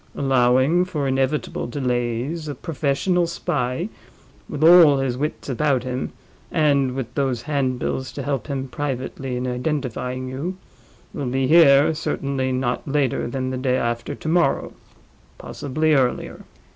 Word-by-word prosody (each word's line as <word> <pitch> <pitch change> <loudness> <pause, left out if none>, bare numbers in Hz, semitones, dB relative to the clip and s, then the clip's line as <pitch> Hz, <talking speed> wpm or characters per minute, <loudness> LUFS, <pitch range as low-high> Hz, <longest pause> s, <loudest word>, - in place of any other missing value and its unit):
Allowing 130 +5 +3
for 150 -6 -2
inevitable 135 +2 -1
delays, 125 +4 -2
a 145 - -4
professional 165 +4 0
spy, 145 -1 -2 0.6
with 150 +1 -3
all 165 -4 +8
his 135 -2 -1
wits 150 +4 -4
about 135 -1 +1
him, 130 0 -3 0.4
and 140 -5 +2
with 120 -3 -5
those 130 -4 -1
handbills 130 -2 -2
to 140 - -5
help 140 -2 -2
him 135 -2 -3
privately 130 -2 -4
in 125 - -3
identifying 125 -1 -3
you, 150 +9 -4 0.6
will 140 - -3
be 130 +2 0
here 145 -1 +6
certainly 135 -3 -2
not 130 +2 -2
later 140 -3 0
than 130 +1 -3
the 130 - -3
day 130 0 +1
after 120 -1 -2
tomorrow—possibly 155 -1 -2
earlier. 130 -4 0
135 Hz, 130 wpm, -22 LUFS, 130-150 Hz, 0.6 s, all